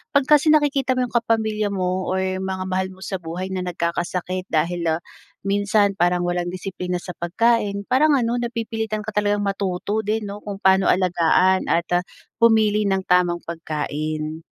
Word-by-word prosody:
pag 280 - +5
kasi 300 0 +5
nakikita 280 -4 +2
mo 255 - +1
yung - - -16
kapamilya 220 -2 +1
mo 185 -1 -1
or 190 - 0
yung 190 0 -2
mga 190 -1 -3
mahal 190 0 0
mo 190 +1 -12
sa 190 -2 -4
buhay 175 +3 -5
na 185 -1 -2
nagkakasakit 180 +2 -2
dahil, 170 +2 0
ah, 170 - -6 0.5
minsan 205 0 +2
parang 175 0 +2
walang 175 0 -1
disiplina 180 -1 -4
sa - - -6
pagkain, 200 +3 +1
parang 290 +4 +4
ano 240 0 0
napipilitan 225 -2 -3
ka 220 - -5
talagang 205 0 +1
matuto 195 +1 -2
din 215 +1 -1
'no 200 +1 -7
kung 205 -1 -5
paano 190 0 +4
alagaan 185 +1 +2
at, 170 0 +1
ah, - - -5 0.4
pumili 215 -2 +4
ng 190 -1 0
tamang 175 -1 +2
pagkain. 155 -1 -4
190 Hz, 170 wpm, -22 LUFS, 180-215 Hz, 0.5 s, pag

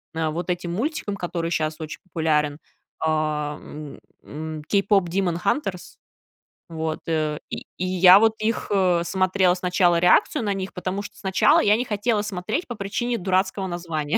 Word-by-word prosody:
э, - - -3
а, 160 -1 0
вот 175 +3 -4
этим 175 -1 -2
мультиком, 225 - -2
который 170 -2 -3
щас 155 -1 -1
очень 155 -1 -7
популярен. 155 -4 0 0.4
А, 155 -1 -1
м, 150 -1 -10 0.2
м, 155 +1 -7
"Кейпопдимонхантерс". 195 - 0 0.7
Вот, 160 -1 -3
э, 155 -2 -1
и - - -6
и 185 - -2
я 185 +1 +7
вот 220 0 +4
их, 220 +1 -1 0.3
смотрела 185 0 +2
сначала, 180 -1 +2
реакцию 185 - +3
на 200 -1 0
них, 190 0 -5
потому 185 +2 -3
что - - -10
сначала 205 - +3
я 210 +2 +4
не 250 - -1
хотела 210 0 0
смотреть 210 - -3
по 240 - -4
причине 225 +4 -2
дурацкого 190 +1 0
названия. 165 -4 -2
180 Hz, 150 wpm, -23 LUFS, 160-200 Hz, 0.7 s, я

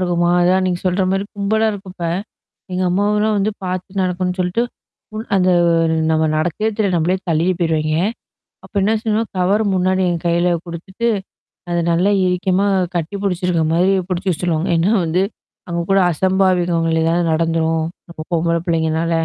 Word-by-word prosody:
இருக்குமா, 175 -1 +1
அதான் 185 +2 +3
நீங்க 175 -1 -1
சொல்ற 185 +1 +1
மாரி 195 +1 0
கும்பலா 220 +2 +1
இருக்கப்ப, 190 -3 -9 0.7
எங்க 185 +1 -1
அம்மாவலாம் 210 +3 +1
வந்து 200 +1 +1
பார்த்து 185 +2 -3
நடக்கணும்னு 180 0 -1
சொல்ட்டு 180 +6 0 0.5
ஓ - - -5 0.2
அந்த 185 -1 +3 0.6
நம்ம 160 0 +2
நடக்கிறதே 175 +8 0
தெரியாது. 200 -4 +1
நம்மளே 175 +3 +1
தள்ளிட்டு 170 +3 +2
போயிருவாய்ங்க. 155 -2 0 0.7
அப்போ - - -17
என்ன 210 +3 +2
செய்வோம் 220 0 -1
கவர் 200 +4 +2
முன்னாடி 185 +1 +1
எங்க 170 -1 -1
கையில 170 +1 +2 0.2
கொடுத்துட்டு 190 +7 -4 0.6
அது 175 0 0
நல்லா 180 +4 +2
இருக்கமா 185 +2 +1 0.3
கட்டி 170 +4 -2
பிடிச்சிருக்கிற 180 -4 0
மாதிரி 180 +3 +3 0.2
பிடிச்சு 185 +1 -1
வச்சுடுவாங்க. 170 +1 -1
ஏன்னா 180 +6 +2
வந்து 170 +3 +1 0.5
அவங்க 170 -1 -2
கூட 195 - +5
அசம்பாவிதங்கள் 175 -2 +1
எதாவது 170 +2 +1
நடந்துடும். 165 0 +1 0.3
அப்போ 165 - -8
பொம்பள 170 0 +1
பிள்ளைங்கனால 160 0 0
180 Hz, 145 wpm, -18 LUFS, 170-190 Hz, 0.7 s, கூட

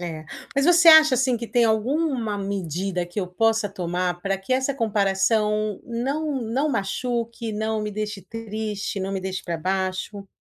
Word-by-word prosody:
É. 160 -3 -6 0.3
Mas, 275 - +3
você 345 0 +6
acha, 310 -4 +9
assim, 255 -1 +2
que 230 0 -5
tem 240 0 +2
alguma 235 0 0
medida 185 -2 -3
que 190 +4 -4
eu 180 - -2
possa 220 +3 +1
tomar 180 -1 -2
pra 195 0 -1
que 195 +7 -4
essa 265 +1 +1
comparação 210 -1 +1
não 270 +4 -2
não 260 +7 0
machuque, 230 +1 -2
não 220 +1 -1
me 210 0 -3
deixe 210 -1 -4
triste, 215 -1 -4
não 195 +1 -3
me 190 - -2
deixe 190 0 -4
pra 170 -1 -2
baixo? 190 +3 -2
215 Hz, 165 wpm, -24 LUFS, 195-235 Hz, 0.3 s, acha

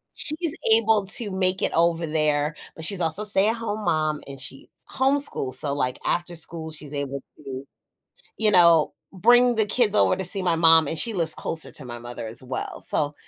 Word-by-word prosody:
She's 310 +1 0 0.2
able 220 -2 +3
to 205 +1 +3
make 185 0 0
it - - 0
over 170 0 +1
there, 150 -1 0 0.2
but 160 - -8
she's 185 +2 +1
also 165 +5 0
a - - 0
stay-at-home 215 +1 +1
mom 155 -1 0
and 135 -1 -9
she 135 +1 -8 0.3
s - - -12
homeschools. 265 - +1
So, 140 +2 0
like, 125 -3 -2
after 175 0 -1
school, 160 0 -7
she's 150 -2 -8
able 140 -1 -4 0.2
to, 135 -2 -8 0.7
you 215 -1 +2
know, 170 -5 +5 0.2
bring 240 +5 +4
the 220 -1 +1
kids 215 0 +1
over - - +3
to 190 - -4
see 190 +2 +1
my 175 -2 +1
mom 165 -1 +5
and 160 - -3
she 230 +7 0
lives 165 -5 +1
closer 165 -1 -3
to 145 - -4
my 120 -1 -8
mother 120 -1 -8
as 115 +4 -2
well. 130 0 -6
So 145 -1 0
165 Hz, 200 wpm, -24 LUFS, 145-210 Hz, 0.7 s, know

